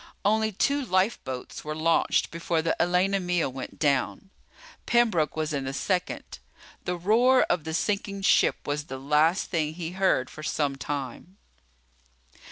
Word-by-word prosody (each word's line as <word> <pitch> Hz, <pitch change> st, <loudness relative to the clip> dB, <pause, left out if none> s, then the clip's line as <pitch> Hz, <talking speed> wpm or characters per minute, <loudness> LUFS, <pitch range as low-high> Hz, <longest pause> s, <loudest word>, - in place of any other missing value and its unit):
Only 220 Hz, +1 st, +2 dB
two 280 Hz, +8 st, +1 dB
lifeboats 185 Hz, -, -2 dB
were 155 Hz, 0 st, -4 dB
launched 165 Hz, +1 st, +2 dB
before 165 Hz, -1 st, -1 dB
the 165 Hz, -, +1 dB
Elena 180 Hz, +3 st, +2 dB
Mia 180 Hz, -2 st, 0 dB
went 130 Hz, 0 st, -8 dB
down. 145 Hz, +6 st, 0 dB, 0.6 s
Pembroke 195 Hz, -, +2 dB
was 155 Hz, 0 st, -2 dB
in 140 Hz, -2 st, -2 dB
the 135 Hz, -, -3 dB
second. 180 Hz, +5 st, -2 dB, 0.5 s
The 180 Hz, -, -1 dB
roar 235 Hz, +8 st, +4 dB
of 175 Hz, -2 st, -1 dB
the 160 Hz, -, -4 dB
sinking 200 Hz, +1 st, -2 dB
ship -, -, +3 dB
was 145 Hz, +1 st, -2 dB
the 135 Hz, -, -6 dB
last 150 Hz, +7 st, +2 dB
thing 155 Hz, -3 st, -1 dB
he 170 Hz, -1 st, -5 dB
heard 185 Hz, -9 st, +1 dB
for -, -, -11 dB
some 145 Hz, -2 st, -1 dB
time. 145 Hz, +6 st, -6 dB
170 Hz, 150 wpm, -26 LUFS, 150-195 Hz, 0.6 s, roar